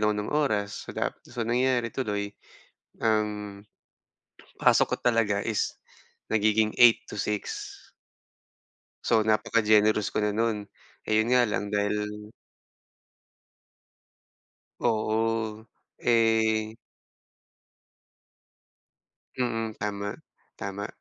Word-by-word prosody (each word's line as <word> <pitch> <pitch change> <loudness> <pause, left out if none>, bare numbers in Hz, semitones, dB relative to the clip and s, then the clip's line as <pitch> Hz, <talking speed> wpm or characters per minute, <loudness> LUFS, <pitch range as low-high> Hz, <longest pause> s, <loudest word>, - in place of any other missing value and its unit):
ako 105 0 +2
ng 105 +5 -3
oras, 110 -9 -1
so - - -8
dap - - 0 0.2
so 120 -1 -4
nangyayari 120 0 +1
tuloy, 105 -5 -2 0.7
um, 105 -2 -1 1.0
pasok - - +3
ko - - -9
talaga 115 -4 +3
is 105 0 -1 0.6
nagiging 110 0 +2
8 120 -2 +6
to - - -9
6. 105 0 -3 1.3
So, 115 -2 +3
napaka-generous 110 -1 +3
ko - - -10
na 105 - +1
no'n. 110 -1 0 0.4
Eh, 110 0 +2
yun 110 - -1
nga 125 -1 +5
lang 105 -2 -2
dahil 105 0 0 2.7
Oo, 110 -1 0 0.3
eh 110 -2 +2 2.6
Mm, 115 -3 -1
tama, 100 0 -3 0.4
tama. 100 +1 -5
110 Hz, 90 wpm, -27 LUFS, 105-115 Hz, 2.7 s, 8